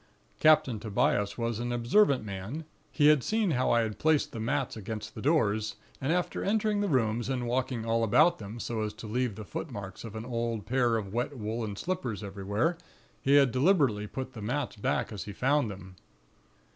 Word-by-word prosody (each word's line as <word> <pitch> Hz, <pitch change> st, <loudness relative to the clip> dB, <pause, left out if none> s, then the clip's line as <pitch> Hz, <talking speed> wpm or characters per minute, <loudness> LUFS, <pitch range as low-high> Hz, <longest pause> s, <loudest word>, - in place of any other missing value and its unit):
"Captain 155 Hz, -7 st, +4 dB
Tobias 105 Hz, -1 st, 0 dB
was 115 Hz, -2 st, -2 dB
an 120 Hz, 0 st, -2 dB
observant 125 Hz, -, +3 dB
man; 105 Hz, +11 st, -5 dB, 0.3 s
he 150 Hz, -, +2 dB
had 150 Hz, -4 st, +4 dB
seen 215 Hz, -4 st, +1 dB
how 130 Hz, -3 st, +1 dB
I 120 Hz, -, +4 dB
had 110 Hz, -2 st, -3 dB
placed 155 Hz, -2 st, +2 dB
the 115 Hz, -, -6 dB
mats 135 Hz, +4 st, -1 dB
against 110 Hz, 0 st, -6 dB
the -, -, -7 dB
doors; 110 Hz, -8 st, +1 dB, 0.3 s
and 135 Hz, +3 st, 0 dB
after 180 Hz, +1 st, -1 dB
entering 210 Hz, 0 st, +1 dB
the 205 Hz, -, +1 dB
rooms, 115 Hz, -2 st, +1 dB
and 125 Hz, -2 st, -1 dB
walking 125 Hz, -1 st, -1 dB
all 115 Hz, 0 st, +1 dB
about 140 Hz, +10 st, +4 dB
them, 105 Hz, +2 st, -7 dB
so 115 Hz, 0 st, -3 dB
as 105 Hz, 0 st, -2 dB
to 110 Hz, +2 st, -10 dB
leave 120 Hz, 0 st, -1 dB
the 110 Hz, -, -8 dB
foot 150 Hz, -, -5 dB
marks 100 Hz, -6 st, -7 dB
of 115 Hz, -2 st, -8 dB
an 110 Hz, +1 st, -5 dB
old 115 Hz, -3 st, -2 dB
pair 120 Hz, -2 st, +2 dB
of 100 Hz, -3 st, -5 dB
wet 125 Hz, +4 st, -2 dB
woollen 110 Hz, -1 st, -3 dB
slippers 125 Hz, -, -3 dB
everywhere, 100 Hz, -, -1 dB, 0.4 s
he 140 Hz, +1 st, +4 dB
had 140 Hz, -3 st, +6 dB
deliberately 130 Hz, -, +2 dB
put 130 Hz, +3 st, -6 dB
the 110 Hz, -, -8 dB
mats 125 Hz, +5 st, -2 dB
back 105 Hz, -, -1 dB
as 100 Hz, -6 st, -6 dB
he 100 Hz, -, -7 dB
found 135 Hz, +2 st, +2 dB
them. 95 Hz, -2 st, -9 dB
120 Hz, 195 wpm, -29 LUFS, 105-140 Hz, 0.4 s, had